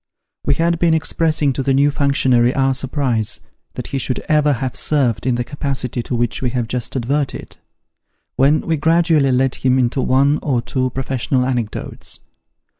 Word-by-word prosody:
We -, -, +2 dB
had 170 Hz, +2 st, 0 dB
been 170 Hz, -2 st, +3 dB
expressing 155 Hz, -3 st, 0 dB
to 130 Hz, -, -3 dB
the 135 Hz, 0 st, +1 dB
new 140 Hz, +2 st, +3 dB
functionary 130 Hz, -4 st, +2 dB
our 135 Hz, 0 st, +2 dB
surprise 130 Hz, -4 st, -1 dB, 0.4 s
that -, -, -6 dB
ho 135 Hz, -, -2 dB
should 130 Hz, 0 st, 0 dB
ever 150 Hz, -1 st, +3 dB
have 130 Hz, 0 st, -3 dB
served 125 Hz, -6 st, 0 dB
in 125 Hz, -, +2 dB
the 120 Hz, -, -1 dB
capacity 135 Hz, -3 st, -3 dB
to 120 Hz, -, -4 dB
which 120 Hz, -1 st, -1 dB
we 125 Hz, -, 0 dB
have 120 Hz, -2 st, -2 dB
just 125 Hz, +2 st, -3 dB
adverted, 135 Hz, +3 st, -2 dB, 0.8 s
when 145 Hz, +4 st, +3 dB
we 165 Hz, -1 st, -1 dB
gradually 160 Hz, -2 st, +3 dB
led 130 Hz, +1 st, +2 dB
him 130 Hz, 0 st, +1 dB
into 130 Hz, +1 st, +1 dB
one 140 Hz, +4 st, +2 dB
or 130 Hz, -5 st, 0 dB
two 130 Hz, 0 st, -1 dB
professional 130 Hz, 0 st, -1 dB
anecdotes. 120 Hz, -5 st, -4 dB
135 Hz, 170 wpm, -18 LUFS, 125-145 Hz, 0.8 s, been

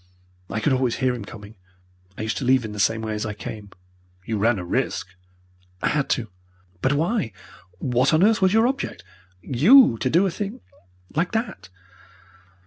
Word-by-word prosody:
I 110 Hz, -, -2 dB
could 135 Hz, +5 st, +1 dB
always 130 Hz, -2 st, +1 dB
hear 130 Hz, -2 st, +1 dB
him 120 Hz, -4 st, -6 dB
coming. 105 Hz, 0 st, -12 dB, 0.6 s
I -, -, -4 dB
used 110 Hz, -, -2 dB
to -, -, -3 dB
leave 130 Hz, -1 st, +3 dB
in 110 Hz, -, -6 dB
the 105 Hz, -, -7 dB
same 110 Hz, +2 st, +1 dB
way 110 Hz, -1 st, -3 dB
as 105 Hz, -, -3 dB
I 105 Hz, -1 st, -4 dB
came." 105 Hz, 0 st, -8 dB, 0.6 s
"You 110 Hz, -2 st, -2 dB
ran 115 Hz, +2 st, +2 dB
a 90 Hz, -, -5 dB
risk." 85 Hz, -, -2 dB, 0.7 s
"I -, -, 0 dB
had 150 Hz, -2 st, 0 dB
to." 115 Hz, -4 st, -1 dB, 0.5 s
"But 130 Hz, -, +2 dB
why? 160 Hz, -, 0 dB, 0.4 s
What 125 Hz, +4 st, +1 dB
on 160 Hz, +3 st, +4 dB
earth 220 Hz, +1 st, +4 dB
was 190 Hz, -1 st, +4 dB
your 225 Hz, +2 st, +4 dB
object 275 Hz, +2 st, -3 dB, 0.4 s
YOU 155 Hz, -, +6 dB
to 130 Hz, -, 0 dB
do 170 Hz, +8 st, +3 dB
a 190 Hz, -, 0 dB
thing 205 Hz, +3 st, -5 dB, 0.6 s
like 170 Hz, +6 st, 0 dB
that!" 225 Hz, -, -3 dB
130 Hz, 185 wpm, -23 LUFS, 110-175 Hz, 0.7 s, YOU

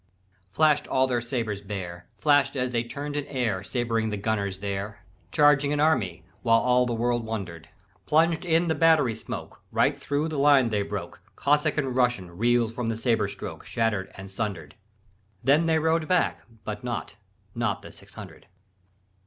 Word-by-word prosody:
"Flash'd 150 Hz, +5 st, +2 dB
all 130 Hz, 0 st, +2 dB
their 125 Hz, -2 st, 0 dB
sabres 115 Hz, -4 st, -3 dB
bare, 90 Hz, -4 st, -6 dB
Flash'd 145 Hz, -2 st, +3 dB
as 125 Hz, -1 st, -1 dB
they 120 Hz, -1 st, 0 dB
turned 145 Hz, +4 st, -6 dB
in 145 Hz, -, -1 dB
air 115 Hz, -8 st, -1 dB
Sabring 115 Hz, -1 st, -1 dB
the 105 Hz, -, -3 dB
gunners 100 Hz, -2 st, -1 dB
there. 100 Hz, +1 st, -5 dB, 0.3 s
Charging 145 Hz, -1 st, +4 dB
an 145 Hz, -, 0 dB
army, 115 Hz, -, +1 dB, 0.2 s
while 115 Hz, -1 st, +4 dB
All 125 Hz, 0 st, +3 dB
the 120 Hz, -, -1 dB
world 120 Hz, 0 st, 0 dB
wonder'd; 90 Hz, -8 st, -6 dB, 0.4 s
Plunged 165 Hz, +2 st, +3 dB
in 170 Hz, 0 st, +2 dB
the 160 Hz, -, +2 dB
battery 160 Hz, -7 st, +4 dB
smoke 110 Hz, -, -7 dB
Right -, -, +2 dB
thro' 145 Hz, +2 st, -2 dB
the 155 Hz, -3 st, -3 dB
line 140 Hz, -4 st, +5 dB
they 105 Hz, -2 st, 0 dB
broke; 100 Hz, -, -5 dB
Cossack 150 Hz, +2 st, +1 dB
and 135 Hz, -4 st, -1 dB
Russian 120 Hz, -9 st, 0 dB
Reel'd 120 Hz, +2 st, +2 dB
from 120 Hz, 0 st, -3 dB
the 115 Hz, -1 st, -1 dB
sabre 115 Hz, 0 st, +1 dB
stroke -, -, -7 dB
Shatter'd 110 Hz, -4 st, -1 dB
and 95 Hz, 0 st, -9 dB
sunder'd. 95 Hz, -8 st, -4 dB, 0.7 s
Then 150 Hz, +5 st, +4 dB
they 160 Hz, -1 st, +3 dB
rode 160 Hz, 0 st, +1 dB
back, 180 Hz, -1 st, +1 dB, 0.2 s
but 105 Hz, +1 st, -5 dB
not, 120 Hz, -2 st, -4 dB, 0.4 s
Not -, -, -2 dB
the -, -, -10 dB
six -, -, -17 dB
hundred. -, -, -11 dB
120 Hz, 170 wpm, -26 LUFS, 105-145 Hz, 0.7 s, line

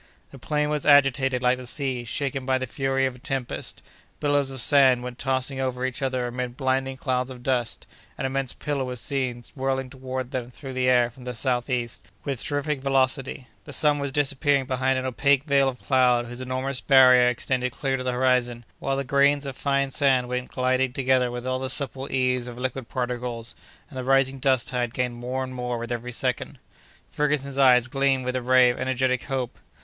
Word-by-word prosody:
The 135 Hz, -, -12 dB
plain 150 Hz, +3 st, -1 dB
was 150 Hz, -1 st, -1 dB
agitated 135 Hz, -3 st, +4 dB
like 125 Hz, +1 st, +3 dB
the 125 Hz, -, -9 dB
sea 130 Hz, -3 st, -3 dB
shaken 135 Hz, +3 st, -2 dB
by 130 Hz, 0 st, +1 dB
the 130 Hz, -, -3 dB
fury 135 Hz, +1 st, 0 dB
of 130 Hz, -, -1 dB
a 125 Hz, -, -15 dB
tempest; 130 Hz, -1 st, -4 dB, 0.4 s
billows 145 Hz, -2 st, +1 dB
of 135 Hz, -1 st, -3 dB
sand 130 Hz, -2 st, +5 dB
went 125 Hz, 0 st, -7 dB
tossing 130 Hz, 0 st, -1 dB
over 130 Hz, -1 st, -2 dB
each 130 Hz, +1 st, -3 dB
other 130 Hz, -2 st, -1 dB
amid 125 Hz, 0 st, -4 dB
blinding 135 Hz, -1 st, -1 dB
clouds 130 Hz, -1 st, -1 dB
of 125 Hz, -2 st, -10 dB
dust; 125 Hz, -3 st, -1 dB, 0.3 s
an -, -, -3 dB
immense 135 Hz, -1 st, -1 dB
pillar 145 Hz, -3 st, -3 dB
was 125 Hz, -1 st, -4 dB
seen 130 Hz, -4 st, -2 dB
whirling 135 Hz, -1 st, -2 dB
toward 130 Hz, -1 st, -5 dB
them 125 Hz, -3 st, -4 dB
through 135 Hz, +1 st, -9 dB
the 130 Hz, 0 st, +1 dB
air 120 Hz, -1 st, +4 dB
from 125 Hz, +2 st, -15 dB
the 125 Hz, -1 st, -5 dB
southeast, 120 Hz, -1 st, -1 dB, 0.2 s
with 135 Hz, -5 st, -2 dB
terrific 145 Hz, -1 st, -2 dB
velocity; 135 Hz, -1 st, 0 dB, 0.2 s
the -, -, -9 dB
sun 150 Hz, -1 st, +3 dB
was 140 Hz, -1 st, -2 dB
disappearing 140 Hz, -1 st, +1 dB
behind 130 Hz, 0 st, 0 dB
an 130 Hz, -, -2 dB
opaque 135 Hz, +2 st, +2 dB
veil 140 Hz, -2 st, +3 dB
of 125 Hz, -, -8 dB
cloud 125 Hz, -2 st, +3 dB
whose 120 Hz, +1 st, -6 dB
enormous 130 Hz, +1 st, -3 dB
barrier 125 Hz, -2 st, +6 dB
extended 125 Hz, +1 st, -1 dB
clear 135 Hz, +2 st, -2 dB
to 130 Hz, -, -3 dB
the 130 Hz, 0 st, -1 dB
horizon, 125 Hz, -2 st, +1 dB
while 135 Hz, 0 st, -1 dB
the 140 Hz, -, -1 dB
grains 140 Hz, +1 st, +2 dB
of 135 Hz, -2 st, -5 dB
fine 140 Hz, 0 st, 0 dB
sand 130 Hz, -3 st, +2 dB
went 125 Hz, 0 st, -3 dB
gliding 130 Hz, 0 st, 0 dB
together 130 Hz, -1 st, +2 dB
with 120 Hz, 0 st, -6 dB
all 130 Hz, 0 st, -1 dB
the 130 Hz, 0 st, -3 dB
supple 135 Hz, 0 st, -1 dB
ease 125 Hz, -1 st, 0 dB
of 120 Hz, -1 st, -8 dB
liquid 130 Hz, -1 st, -4 dB
particles, 120 Hz, -2 st, -3 dB, 0.3 s
and 135 Hz, -4 st, -8 dB
the -, -, -3 dB
rising 135 Hz, 0 st, +2 dB
dust 130 Hz, -2 st, +2 dB
tide 120 Hz, -2 st, -2 dB
gained 125 Hz, -1 st, -1 dB
more 125 Hz, +2 st, -3 dB
and 130 Hz, 0 st, -6 dB
more 125 Hz, -1 st, -3 dB
with 120 Hz, +1 st, -6 dB
every 120 Hz, +1 st, -4 dB
second. 125 Hz, +1 st, -2 dB, 0.5 s
Ferguson's 140 Hz, -2 st, -1 dB
eyes 125 Hz, -2 st, +6 dB
gleamed 135 Hz, -1 st, +1 dB
with 125 Hz, 0 st, -2 dB
a 130 Hz, -, -1 dB
ray 125 Hz, 0 st, +5 dB
of -, -, -7 dB
energetic 130 Hz, -1 st, 0 dB
hope. 130 Hz, -3 st, -3 dB
130 Hz, 200 wpm, -25 LUFS, 125-135 Hz, 0.5 s, barrier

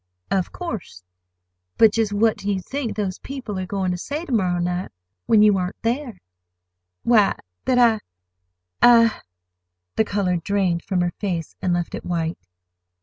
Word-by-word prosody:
"Of 190 Hz, -2 st, 0 dB
course. 225 Hz, -, -6 dB, 0.7 s
But—just 220 Hz, -1 st, +4 dB
what 215 Hz, +2 st, +3 dB
do 205 Hz, -, -2 dB
you 195 Hz, -, 0 dB
think 240 Hz, +1 st, -4 dB
these 200 Hz, -3 st, -2 dB
people 245 Hz, -8 st, -6 dB
are 185 Hz, -, -4 dB
going 190 Hz, -1 st, -1 dB
to 180 Hz, -, -3 dB
say 295 Hz, -, -4 dB
to -, -, -8 dB
morrow 185 Hz, -6 st, +2 dB
night, 175 Hz, +1 st, -2 dB, 0.4 s
when 215 Hz, -1 st, +6 dB
you 205 Hz, -2 st, +5 dB
aren't 180 Hz, +1 st, -4 dB
there?" 240 Hz, -1 st, -1 dB, 0.9 s
"Why, 220 Hz, -4 st, +4 dB, 0.3 s
that 255 Hz, -, +2 dB
I—I—" 90 Hz, -, +2 dB, 0.8 s
The -, -, +5 dB
color 200 Hz, -4 st, 0 dB
drained 180 Hz, -1 st, 0 dB
from 185 Hz, -3 st, 0 dB
her 175 Hz, 0 st, 0 dB
face 175 Hz, -6 st, -3 dB
and 185 Hz, -, 0 dB
left 175 Hz, -1 st, -1 dB
it -, -, -5 dB
white. 165 Hz, -1 st, -2 dB
195 Hz, 150 wpm, -22 LUFS, 175-225 Hz, 0.9 s, when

